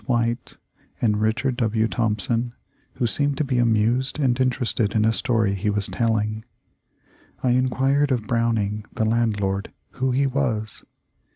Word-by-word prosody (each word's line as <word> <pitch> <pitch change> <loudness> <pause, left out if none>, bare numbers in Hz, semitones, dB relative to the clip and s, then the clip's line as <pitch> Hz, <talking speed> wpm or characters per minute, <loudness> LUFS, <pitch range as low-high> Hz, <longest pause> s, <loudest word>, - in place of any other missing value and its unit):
White, 120 -2 -1 0.4
and 105 -3 +1
Richard 120 +4 0
W. 110 -2 +1
Thompson, 115 +1 0 0.4
who 125 - -1
seemed 140 +4 0
to - - +1
be 130 -3 0
amused 120 +4 +2
and 130 -3 +1
interested 120 -4 0
in 110 0 +3
a 110 - +3
story 110 -5 +1
he 100 +2 -1
was 105 -1 0
telling. 110 -2 -1 1.0
I 125 - +3
enquired 135 +3 +2
of 120 -4 0
Browning, 110 -2 0
the 110 - 0
landlord, 105 -3 0 0.2
who 130 +1 -1
he 135 +2 +2
was. 125 -6 -2
115 Hz, 145 wpm, -23 LUFS, 110-130 Hz, 1.0 s, in